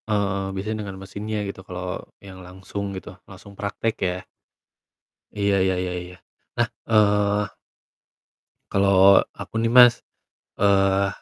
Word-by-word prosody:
Eee, 100 -2 0
biasanya 110 +3 -3
dengan 100 -2 -7
mesinnya 105 +3 -5
gitu, 100 -1 -7
kalo 90 -1 -6 0.2
yang 95 -1 -11
langsung 95 +2 -6
gitu, 95 - -9 0.2
langsung 100 +1 -13
praktek 100 +3 -3
ya. 90 -1 -1 1.2
Iya 100 0 +2
iya 95 0 +2
iya 90 - -3
iya. 90 0 -12 0.4
Nah, - - +2 0.2
eee 105 -2 +3 1.2
kalau 100 0 +6 0.2
aku 115 - -5
nih 115 - +1
Mas, 120 0 +7 0.6
eee 100 -1 +3
100 Hz, 125 wpm, -23 LUFS, 95-105 Hz, 1.2 s, Mas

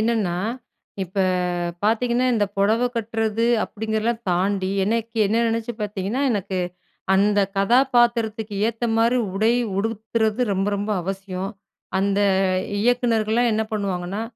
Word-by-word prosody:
என்னன்னா, 215 -6 0 0.7
இப்ப 185 +3 -18 0.7
பார்த்தீங்கன்னா, 240 +3 +2
இந்த 210 -2 +2
புடவ 220 +5 +2
கட்டுறது 225 0 0 0.2
அப்டிங்கிறதலாம் 220 +2 -2
தாண்டி, 190 +1 0
எனைக்கு 230 +2 -2
என்ன 225 +4 +1
நெனச்சு 230 +1 -1
பார்த்தீங்கன்னா, 205 +4 -2
எனக்கு 195 -3 -2 0.6
அந்த 205 +1 +3 0.2
கதாபாத்திரத்துக்கு 235 -1 +2
ஏத்த 230 +1 -4
மாரி 230 +2 +3 0.2
உடை 220 +4 +3 0.3
உடுத்துறது 220 +1 -1
ரொம்ப 195 +1 0
ரொம்ப 205 +2 -3
அவசியம். 195 0 -4 0.5
அந்த 200 +1 +1 0.6
இயக்குனர்கள்லாம் 235 -1 +2
என்ன 220 +1 +1
பண்ணுவாங்கன்னா, 195 0 -2
220 Hz, 110 wpm, -22 LUFS, 200-230 Hz, 0.7 s, அந்த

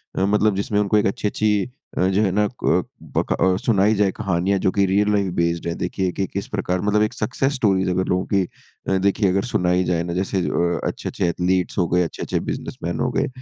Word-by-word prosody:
अ, 95 - +1
मतलब 105 0 +2
जिसमें 100 +1 0
उनको 105 +1 +2
एक 105 - +2
अच्छी-अच्छी 105 +2 0 0.3
अ, 90 - +3
जो 95 +2 +2
है 100 -3 +2
ना 105 +2 +2 0.2
क - - +3 0.2
ब - - -2
क - - +5
अ, 95 0 +2
सुनाई 105 -1 +3
जाए 100 -2 +2
कहानियाँ 95 -1 0
जो 95 - +1
कि 100 0 +2
रियल 105 +2 +2
लाइफ़ 100 -2 +1
बेस्ड 85 0 0
है। 85 - -1
देखिए 90 0 -2
कि 95 - -2
किस 100 - -3
प्रकार 90 -3 -2
मतलब 105 +1 +2
एक 110 - -1
सक्सेस 135 +3 -1
स्टोरीस 95 -7 +2
अगर 90 +1 0
लोगों 90 +1 0
की 100 -1 +4 0.5
अ, 95 - +2
देखिए 100 +1 +2
अगर 95 +1 +1
सुनाई 90 +1 +2
जाए 85 -2 0
ना 85 0 -4
जैसे 95 +2 -1
अ, 85 0 0
अच्छे-अच्छे - - -2
एथलीट्स 90 +1 0
हो 90 -3 +2
गए, 90 +2 +2
अच्छे-अच्छे 85 - -3
बिज़नेसमैन - - -4
हो - - +1
गए। - - 0
95 Hz, 225 wpm, -22 LUFS, 90-105 Hz, 0.5 s, क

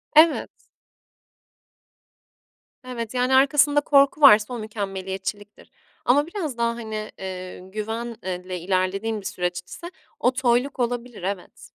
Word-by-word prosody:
Evet. 315 +1 +5 2.3
Evet, 235 -3 -5
yani 250 +1 +1
arkasında 290 +2 +4
korku 280 +1 +4
varsa 215 -4 +7
o 240 - -4
mükemmeliyetçiliktir 200 -1 -6 0.3
ama 285 +5 +4
biraz 330 - -4
daha 235 0 +1
hani, 220 -2 -5
eee, 185 -1 -6
güven 220 +5 -5
eee, 185 0 -5
le 180 - -3
ilerlediğim 195 +4 -1
bir - - -16
süreç 180 -1 -2
ise 345 +1 -9 0.3
o 250 - +3
toyluk 255 +1 +1
olabilir. 240 -4 -3
Evet. 195 -1 -5
225 Hz, 120 wpm, -24 LUFS, 190-260 Hz, 2.3 s, varsa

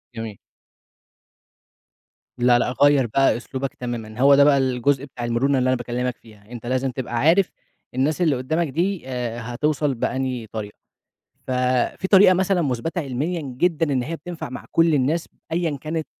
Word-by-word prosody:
جميل. 115 -3 -6 2.0
لا، 120 0 +4
لأ 125 - 0
غيِّر 145 -3 +5
بقى 135 +2 +2
أسلوبك 130 +2 -5
تمامًا. 120 -2 -6
هو 140 0 +7
ده 140 - +6
بقى 145 -1 +5
الجزء 135 +1 +1
بتاع 125 -3 -7
المرونة 130 +4 +1
اللي 130 - +1
أنا 130 - +2
باكلمك 120 0 -3
فيها، 105 -1 -19
أنت 120 -1 -8
لازم 130 +2 0
تبقى 125 -1 -5
عارف 170 +9 +3 0.4
الناس 150 +7 0
اللي 155 -6 +3
قدامك 155 +6 -1
دي، 170 +2 -2
آآ، 120 -2 -3
هتوصل 150 +2 0
بأنهي 125 -1 -2
طريقة 105 -1 -7 0.7
ف - - -6 0.5
في 190 - -2
طريقة 190 -2 +7
مثلًا 185 -1 +1
مثبتة 145 +6 -2
علميًا 150 +5 -2 0.2
جدًا 165 -2 +1
إن 130 - +1
هي 165 +6 -4
بتنفع 170 -5 -7
مع 130 - -7
كل 165 -1 +4
الناس، 150 +5 0 0.2
أيًا 165 -3 0
كانت 155 0 -3
135 Hz, 165 wpm, -22 LUFS, 120-160 Hz, 2.0 s, هو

